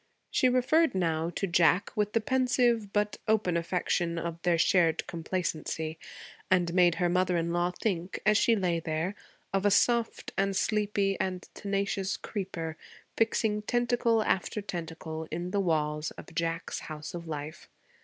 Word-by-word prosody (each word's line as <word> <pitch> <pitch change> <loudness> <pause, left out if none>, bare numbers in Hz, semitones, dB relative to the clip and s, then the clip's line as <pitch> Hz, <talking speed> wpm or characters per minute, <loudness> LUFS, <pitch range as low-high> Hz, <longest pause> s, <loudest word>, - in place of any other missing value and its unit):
She 255 - +3
referred 255 +4 +3
now 165 -2 0
to - - 0
Jack 175 +1 +3
with 210 0 0
the 225 - +2
pensive 245 -3 +2
but 210 0 0
open 215 -5 +2
affection 170 0 0
of 170 0 -4
their 175 -1 +2
shared 165 -1 +3
complacency, 160 -2 -3 0.5
and 175 -2 +2
made 175 -2 +5
her 175 - +1
mother 180 0 +2
in 170 0 -1
law 175 0 +1
think, 180 -1 -3
as 215 +1 +5
she 230 +1 +4
lay 180 -5 0
there, 165 +3 -2 0.4
of 195 0 +1
a 205 - +5
soft 235 +3 +2
and 195 0 +1
sleepy 205 -2 +1
and 185 -1 -2
tenacious 200 -1 -1
creeper, 170 -6 -5 0.4
fixing 220 -1 +1
tentacle 240 -1 +1
after 190 +1 0
tentacle 160 -4 -5
in 175 +2 -4
the 200 - +1
walls 150 -3 0
of - - -11
Jack's 165 0 -2
house 155 -1 -7
of 170 -1 -6
life. 150 0 -6
180 Hz, 155 wpm, -29 LUFS, 165-210 Hz, 0.5 s, made